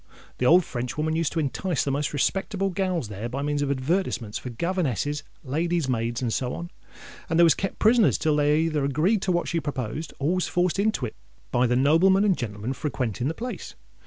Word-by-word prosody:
The 125 Hz, -, +2 dB
old 175 Hz, +4 st, +6 dB
Frenchwoman 150 Hz, +6 st, -2 dB
used 165 Hz, -2 st, 0 dB
to 165 Hz, -, 0 dB
entice 160 Hz, +2 st, -1 dB
the 140 Hz, -, -1 dB
most 145 Hz, +2 st, -1 dB
respectable 195 Hz, +6 st, 0 dB
gals 185 Hz, -, -1 dB
there 105 Hz, +3 st, -5 dB
by 135 Hz, +3 st, -3 dB
means 145 Hz, 0 st, 0 dB
of 145 Hz, -, 0 dB
advertisements 130 Hz, -, -1 dB
for 125 Hz, -, -7 dB
governesses, 145 Hz, -, -1 dB, 0.2 s
ladies 165 Hz, +3 st, 0 dB
maids, 120 Hz, 0 st, -1 dB
and 115 Hz, -2 st, 0 dB
so 125 Hz, -1 st, -1 dB
on; 170 Hz, +1 st, -7 dB, 0.6 s
and 165 Hz, -, +1 dB
they 170 Hz, -, +7 dB
was 165 Hz, -, +7 dB
kept 195 Hz, -, -4 dB
prisoners 225 Hz, 0 st, +4 dB
till 155 Hz, -2 st, +1 dB
they 150 Hz, +1 st, +3 dB
either 155 Hz, -3 st, 0 dB
agreed 155 Hz, -, +2 dB
to 190 Hz, -, 0 dB
what 175 Hz, -1 st, 0 dB
she 170 Hz, -, 0 dB
proposed, 145 Hz, 0 st, -4 dB
or 145 Hz, +5 st, +1 dB
was 185 Hz, -1 st, 0 dB
forced 180 Hz, +1 st, 0 dB
into 210 Hz, -10 st, +1 dB
it 110 Hz, -, -7 dB, 0.4 s
by 125 Hz, +1 st, +3 dB
the 125 Hz, -, +1 dB
noblemen 165 Hz, +9 st, +4 dB
and 200 Hz, -3 st, +3 dB
gentlemen 110 Hz, -1 st, -4 dB
frequenting 125 Hz, -4 st, -2 dB
the 160 Hz, -, -2 dB
place. 245 Hz, +2 st, -6 dB
150 Hz, 205 wpm, -25 LUFS, 130-175 Hz, 0.6 s, they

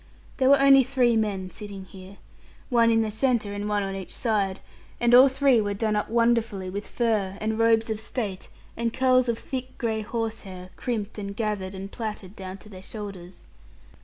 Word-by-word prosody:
There 260 Hz, -1 st, +3 dB
were 280 Hz, 0 st, +7 dB
only 275 Hz, -1 st, +7 dB
three 240 Hz, -2 st, +2 dB
men 200 Hz, -4 st, -1 dB
sitting 200 Hz, 0 st, -8 dB
here, 190 Hz, +1 st, -13 dB, 0.5 s
one 235 Hz, -2 st, +4 dB
in 225 Hz, -1 st, +3 dB
the 215 Hz, -, -3 dB
centre, 220 Hz, -2 st, 0 dB
and 205 Hz, +1 st, -3 dB
one 205 Hz, -1 st, +1 dB
on 195 Hz, 0 st, -3 dB
each 190 Hz, -2 st, -6 dB
side; 200 Hz, -5 st, 0 dB, 0.4 s
and 240 Hz, 0 st, +3 dB
all 255 Hz, +2 st, +9 dB
three 265 Hz, -3 st, +3 dB
were 205 Hz, -1 st, -2 dB
done 215 Hz, +1 st, 0 dB
up 210 Hz, -, -1 dB
wonderfully 230 Hz, -5 st, +1 dB
with 200 Hz, +2 st, -5 dB
fur, 210 Hz, -5 st, 0 dB
and 220 Hz, +1 st, -2 dB
robes 225 Hz, 0 st, +3 dB
of 215 Hz, -, -2 dB
state, 215 Hz, -4 st, -4 dB, 0.3 s
and 235 Hz, 0 st, -1 dB
curls 255 Hz, 0 st, +3 dB
of 230 Hz, -, 0 dB
thick 255 Hz, 0 st, -6 dB
gray 220 Hz, -3 st, -1 dB
horsehair, 215 Hz, -5 st, -5 dB
crimped 220 Hz, -4 st, -4 dB
and 200 Hz, -1 st, -5 dB
gathered, 205 Hz, -3 st, -3 dB
and 195 Hz, +1 st, -7 dB
plaited 210 Hz, -4 st, -6 dB
down 190 Hz, 0 st, -7 dB
to 210 Hz, -, -14 dB
their 185 Hz, -3 st, -11 dB
shoulders. 195 Hz, -3 st, -9 dB
215 Hz, 190 wpm, -26 LUFS, 195-235 Hz, 0.5 s, all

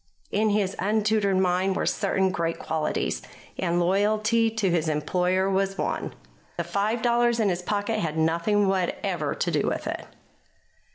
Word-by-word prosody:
In 215 Hz, +2 st, +2 dB
his 200 Hz, -2 st, 0 dB
untutored 210 Hz, -1 st, +1 dB
mind 185 Hz, +1 st, +1 dB
were -, -, -1 dB
certain 190 Hz, -2 st, +1 dB
great 165 Hz, -2 st, -2 dB
qualities, 155 Hz, -1 st, -2 dB, 0.4 s
and 175 Hz, -1 st, +1 dB
loyalty 215 Hz, +5 st, +2 dB
to 215 Hz, -4 st, 0 dB
his 165 Hz, -2 st, +1 dB
employer 180 Hz, +5 st, +1 dB
was 195 Hz, 0 st, 0 dB
one. -, -, -3 dB, 0.4 s
The 170 Hz, -, 0 dB
five 205 Hz, +7 st, -1 dB
dollars 240 Hz, 0 st, +2 dB
in 215 Hz, -3 st, +3 dB
his 180 Hz, -1 st, -1 dB
pocket 205 Hz, +3 st, -1 dB
had 160 Hz, -4 st, -2 dB
nothing 170 Hz, +6 st, +2 dB
whatever 190 Hz, -2 st, -1 dB
to -, -, -1 dB
do -, -, +1 dB
with -, -, -2 dB
it. -, -, -4 dB
195 Hz, 155 wpm, -26 LUFS, 175-215 Hz, 0.4 s, in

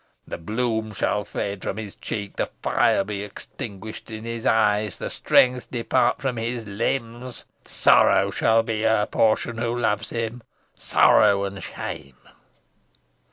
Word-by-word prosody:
The -, -, -6 dB
bloom 110 Hz, +3 st, -2 dB
shall 105 Hz, +1 st, 0 dB
fade 100 Hz, -1 st, -4 dB
from 95 Hz, -, -4 dB
his 105 Hz, -3 st, -7 dB
cheek, 100 Hz, -2 st, -5 dB
the -, -, 0 dB, 0.2 s
fire -, -, +3 dB
be 100 Hz, 0 st, -5 dB
extinguished 105 Hz, +1 st, -9 dB
in 110 Hz, -1 st, -7 dB
his 115 Hz, 0 st, -4 dB
eyes, 105 Hz, -2 st, +2 dB
the -, -, -5 dB
strength 125 Hz, 0 st, +3 dB
depart 125 Hz, +1 st, +1 dB
from 130 Hz, -3 st, -1 dB
his 115 Hz, 0 st, -3 dB
limbs. 115 Hz, +3 st, -3 dB, 0.2 s
Sorrow -, -, +4 dB
shall 115 Hz, 0 st, +3 dB
be 110 Hz, -1 st, -2 dB
her 110 Hz, -2 st, +3 dB
portion 115 Hz, +2 st, +1 dB
who 120 Hz, +1 st, -1 dB
loves 105 Hz, -3 st, 0 dB
him 115 Hz, +1 st, -4 dB, 0.3 s
sorrow 100 Hz, -2 st, +4 dB
and 100 Hz, -1 st, -5 dB
shame!" 70 Hz, -5 st, -7 dB
110 Hz, 140 wpm, -24 LUFS, 105-115 Hz, 0.3 s, Sorrow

